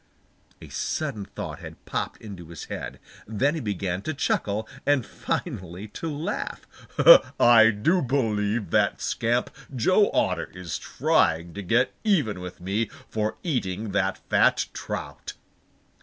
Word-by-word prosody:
A - - -11
sudden 135 -10 -3
thought - - -7
had - - -11
popped - - -3
into 95 -6 -9
his 85 -3 -8
head. - - -6 0.3
Then 120 +7 +1
he 160 - -3
began 95 -4 -2
to 155 +8 -4
chuckle 110 -5 -1 0.2
and 145 -3 +2
finally 90 +3 -4
to 165 +9 -5
laugh. 155 +8 -4 0.7
"I 115 -2 +7
do 115 - +2
believe 110 -6 0
that - - +2
scamp 120 +2 0 0.2
Joe 185 - +4
Otter - - 0
is 85 -4 -5
trying 85 +1 +1
to 100 - -5
get 120 +7 +2
even 150 - +1
with 90 0 -8
me 100 +5 -1 0.2
for 110 0 -2
eating 110 - -2
that 95 -1 0
fat - - +3
trout!" - - -6
110 Hz, 135 wpm, -25 LUFS, 95-130 Hz, 0.7 s, I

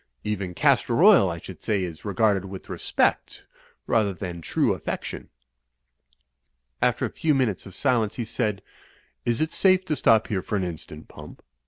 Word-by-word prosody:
Even 100 -4 -3
castor 140 - +2
oil, 195 - +7
I 85 - -4
should 85 -1 -11
say, 105 -3 0
is 85 -3 -7
re 100 -2 -4
garded 100 -2 +2
with 95 -1 -9
respect - - -1 0.4
rather 105 -4 +1
than 90 -2 -6
true - - +1
affection." - - -5 1.5
After - - +2
a - - -3
few 155 -2 +1
minutes 115 -8 -1
of 95 - -12
silence, 115 -6 +1
he 120 - -3
said, 105 -3 -2 0.6
"Is 120 +2 0
it 155 - -1
safe 185 -1 +3
to 155 - -1
stop 110 -4 +4
here 100 -3 -2
for 105 - -4
an 100 - 0
instant. 80 -3 -7
Pump?" - - -13
105 Hz, 170 wpm, -25 LUFS, 95-125 Hz, 1.5 s, oil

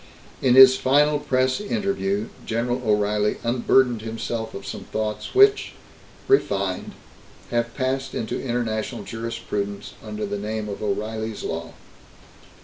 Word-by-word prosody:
In 125 -2 +4
his 130 0 +9
final 145 +3 +3
press 130 -2 +1
interview, 195 - -1
General 120 +2 -1
O'Reilly 105 -1 +1
unburdened 120 0 +2
himself 110 0 -4
of 100 - -7
some - - -6
thoughts 110 - -4
which 405 +1 +5 0.5
refined 100 - +1 0.6
have 120 0 -1
passed 130 0 -2
into 110 - -3
international 120 -2 -2
jurisprudence 115 -3 -4
under 105 -1 -4
the 100 0 -4
name 105 +1 -3
of 100 - -6
O'Reilly's 110 +1 -3
Law. 80 0 -4
115 Hz, 120 wpm, -23 LUFS, 105-130 Hz, 0.6 s, his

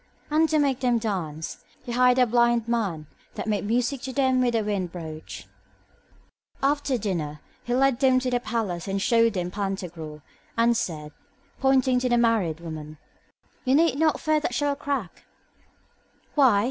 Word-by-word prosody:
And, 315 +1 +3
to 315 - +2
make 275 -3 +2
them 245 -2 +2
dance, 175 -9 -4 0.2
he 240 - -6
hired 250 +1 +4
a 250 - +5
blind 235 -1 +2
man 200 -10 -1 0.3
that - - -4
made 210 -2 -1
music 245 +4 0
to 265 - -5
them 260 -1 +2
with 240 -2 +1
a 225 - +1
wind 200 -4 -2
broach. 160 -3 -8 1.2
After 280 -1 +1
dinner 165 -9 -3 0.3
he 240 - 0
led 270 -1 +3
them 260 -2 +4
to 255 0 -1
the 245 - +2
palace 215 -8 -3
and 195 0 -1
showed 230 +1 +3
them 180 -2 -2
to - - -15
Pantagruel, 175 -7 -5 0.3
and 235 +1 +4
said, 155 -8 -3 0.5
pointing 260 -1 +3
to 250 0 0
the 240 - +3
married 220 -9 +2
woman, 155 -2 -7 0.7
You 260 0 +3
need 325 -3 +4
not 315 -2 +2
fear 310 0 +2
that 245 -5 -3
she 290 - 0
will 285 -1 +1
crack. 280 -10 -4 1.1
Why? 260 -9 +5
235 Hz, 170 wpm, -25 LUFS, 185-260 Hz, 1.2 s, a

